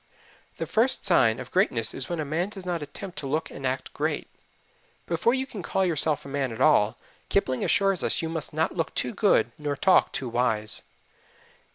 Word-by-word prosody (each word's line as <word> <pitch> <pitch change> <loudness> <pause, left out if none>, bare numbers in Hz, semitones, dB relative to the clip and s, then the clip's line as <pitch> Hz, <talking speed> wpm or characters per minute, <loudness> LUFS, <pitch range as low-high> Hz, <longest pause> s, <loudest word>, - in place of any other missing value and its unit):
The - - -3
first 235 +4 +4
sign 125 - +4
of - - -8
greatness 125 - +1
is 135 - -5
when 175 -2 -3
a 155 - -2
man 165 +6 -1
does 195 -3 -10
not 175 -3 -2
attempt 175 +6 -7
to 140 - -4
look 155 +4 -2
and 135 - -4
act 130 +1 -4
great. - - -2 0.8
Before 200 +9 +1
you 265 0 -1
can 220 -7 -8
call 190 +2 0
yourself 155 -3 +1
a - - -8
man 135 -2 -2
at 110 - -8
all, 115 -7 +4 0.3
Kipling 130 -10 0
assures 195 -3 +2
us, - - 0
you 165 - -2
must 160 -2 -4
"not - - 0
look - - -2
too - - -2
good - - +2
nor 145 -1 -2
talk 190 +6 +3
too 130 -1 -3
wise." 115 -3 +1
155 Hz, 200 wpm, -26 LUFS, 130-185 Hz, 0.8 s, first